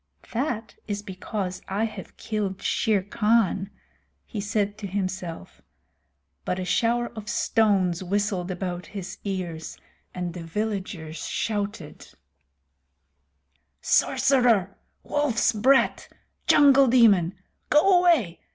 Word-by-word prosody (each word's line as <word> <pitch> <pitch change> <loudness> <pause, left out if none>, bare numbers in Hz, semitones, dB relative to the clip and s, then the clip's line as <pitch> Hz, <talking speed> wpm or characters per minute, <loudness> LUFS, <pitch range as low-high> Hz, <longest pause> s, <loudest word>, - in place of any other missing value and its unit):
"That 235 -3 -2
is 205 -1 -3
because 190 -1 -5
I 200 +3 -1
have 220 - -9
killed 200 -3 -3
Shere 210 -4 +1
Khan," 210 -2 +1 0.6
he 210 - -5
said 205 0 -1
to 205 - -5
himself. 185 -3 -5 0.8
But 180 - -2
a 185 - -3
shower 235 +4 +1
of 215 -1 -7
stones 200 -7 +1
whistled 195 -1 -1
about 180 -2 -4
his 190 0 -7
ears, 180 -5 -5 0.3
and 180 -1 -4
the 175 - -7
villagers 180 -3 -4
shouted: 205 -7 -4 1.7
"Sorcerer! 235 -8 +3 0.3
Wolf's 290 -7 +1
brat! 260 +6 +2 0.4
Jungle 275 -2 +6
demon! 205 -8 +4 0.3
Go 355 +5 +5
away! 305 - +2
205 Hz, 105 wpm, -25 LUFS, 185-230 Hz, 1.7 s, Jungle